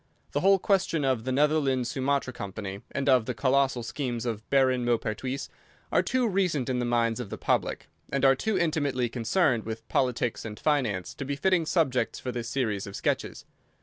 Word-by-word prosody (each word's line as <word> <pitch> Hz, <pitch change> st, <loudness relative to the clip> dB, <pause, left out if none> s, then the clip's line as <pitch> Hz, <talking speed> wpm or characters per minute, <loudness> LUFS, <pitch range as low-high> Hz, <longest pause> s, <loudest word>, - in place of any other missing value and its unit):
The 145 Hz, -, 0 dB
whole 195 Hz, +4 st, +5 dB
question 180 Hz, -6 st, +1 dB
of 130 Hz, -4 st, 0 dB
the 130 Hz, -, -1 dB
Netherland 140 Hz, -2 st, +2 dB
Sumatra 135 Hz, +1 st, -1 dB
Company 100 Hz, -2 st, -6 dB
and 140 Hz, 0 st, -2 dB
of 130 Hz, -4 st, +4 dB
the 125 Hz, -, -2 dB
colossal 130 Hz, +2 st, +2 dB
schemes 120 Hz, -1 st, -3 dB
of 110 Hz, -2 st, -4 dB
Baron 130 Hz, -2 st, +3 dB
Maupertuis 120 Hz, +3 st, -1 dB, 0.4 s
are -, -, +4 dB
too 255 Hz, -2 st, +1 dB
recent 180 Hz, -, 0 dB
in 125 Hz, -1 st, 0 dB
the 120 Hz, -, 0 dB
minds 115 Hz, -1 st, +1 dB
of 120 Hz, -5 st, -5 dB
the -, -, -5 dB
public, -, -, -1 dB, 0.2 s
and 140 Hz, 0 st, +1 dB
are 135 Hz, -, +7 dB
too 210 Hz, +11 st, -1 dB
intimately 145 Hz, -7 st, 0 dB
concerned 120 Hz, -, +1 dB
with 115 Hz, 0 st, -6 dB
politics 125 Hz, -3 st, 0 dB
and 105 Hz, -2 st, -7 dB
finance 120 Hz, -, 0 dB
to -, -, -6 dB
be 140 Hz, +1 st, -3 dB
fitting 170 Hz, +2 st, +2 dB
subjects 150 Hz, -8 st, +1 dB
for 125 Hz, -, -4 dB
this 120 Hz, -1 st, -4 dB
series 110 Hz, -8 st, -1 dB
of 100 Hz, -, -8 dB
sketches. -, -, -2 dB
130 Hz, 185 wpm, -27 LUFS, 115-145 Hz, 0.4 s, are